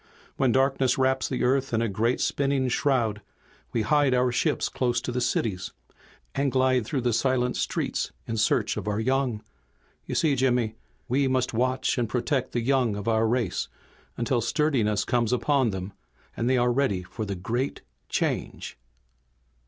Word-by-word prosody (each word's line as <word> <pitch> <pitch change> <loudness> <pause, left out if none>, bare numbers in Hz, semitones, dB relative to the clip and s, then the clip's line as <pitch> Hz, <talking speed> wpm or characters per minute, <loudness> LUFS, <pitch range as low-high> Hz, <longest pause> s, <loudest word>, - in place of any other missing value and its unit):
When 130 -2 +2
darkness 135 0 +2
wraps 130 0 +1
the 130 - -1
Earth 130 -1 +1
in - - +2
a - - +1
great, 115 +5 0
spinning 135 -2 +1
shroud 120 -6 +1 0.5
we 115 - 0
hide 140 +2 +3
our 125 0 +2
ships 120 - +1
close 120 -2 0
to 125 +1 -4
the 125 +1 -1
cities, 95 -6 -1 0.6
and 140 0 0
glide 130 -3 +2
through 135 -1 -1
the 120 -1 +1
silent 125 +1 +1
streets - - -2
in 115 - -3
search 110 - +1
of - - -5
our 105 0 0
young. 130 -2 0 0.6
You - - -3
see, 150 -4 +2
Jimmy, 125 -4 +1 0.3
we 135 +3 +2
must 130 -1 0
watch 130 +2 0
and 115 -3 -1
protect 130 +2 -1
the 120 - -1
young 125 -3 +2
of 100 +1 -6
our 110 0 +3
race 115 -4 0 0.5
until 120 +1 0
sturdiness 115 -6 +1
comes 120 -2 +1
upon 130 +1 +2
them, 95 0 -5 0.4
and 120 - -1
they 130 - +3
are 120 0 +3
ready 120 -9 +1
for 110 - -6
the 100 -2 -3
Great 120 +9 -2 0.3
Change." - - -2
125 Hz, 170 wpm, -26 LUFS, 115-130 Hz, 0.6 s, hide